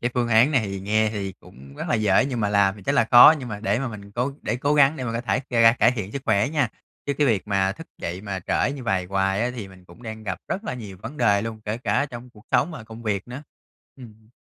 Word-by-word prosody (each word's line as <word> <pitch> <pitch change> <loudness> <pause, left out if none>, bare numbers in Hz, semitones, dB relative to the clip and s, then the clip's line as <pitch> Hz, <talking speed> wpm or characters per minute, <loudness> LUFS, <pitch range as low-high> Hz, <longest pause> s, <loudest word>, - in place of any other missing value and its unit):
cái 120 - -1
phương 120 -2 0
án 115 +5 +5
này 135 -5 +3
thì 100 -1 -5
nghe 110 +3 +1
thì 100 -3 -4
cũng 70 +2 -15
rất - - -5
là - - +2
dễ 105 -2 +3
nhưng 125 -4 -3
mà 105 - +1
làm 100 -1 +2
thì 100 - -13
chắc - - 0
là - - +4
khó, 120 +6 +10
nhưng 125 -3 -7
mà 105 -1 -6
để 105 0 0
mà 135 0 -2
mình 100 -2 -10
cố 125 +5 -1
để - - -1
cố 145 +4 0
gắng 145 +1 +4
để 130 - -5
mình 115 - -3
có 115 - -2
thể 110 -4 -1
ngày 115 -2 +3
càng 115 +2 +6
cải - - +5
thiện 110 -5 -5
sức 140 - -5
khỏe 105 +1 +2
nha, 150 -6 0 0.4
chứ 140 - +1
cái 150 - +2
việc 105 -4 0
mà 95 -1 +1
thức 165 +11 -11
dậy 90 +2 -5
mà 100 -2 -5
trễ 135 - +1
như 140 -2 -7
vầy 95 -4 0
hoài 95 +2 0
á 120 - 0
thì 110 -6 -7
mình 95 -1 -17
cũng 120 - -17
đang 110 -2 -7
gặp 95 -3 -4
rất 200 - -3
là 125 - -3
nhiều 105 -6 -9
vấn 130 +7 -7
đề 105 -6 +2
luôn, 110 -1 -6
kể 110 +2 -3
cả 140 +3 0
trong 125 -2 -10
cuộc 105 -2 -19
sống 130 +6 +2
và 150 -9 -9
công 110 +1 -11
việc 100 -1 -2
nữa. 130 +4 -7 0.5
Ừm. 110 -4 -15
110 Hz, 295 wpm, -23 LUFS, 100-125 Hz, 0.5 s, khó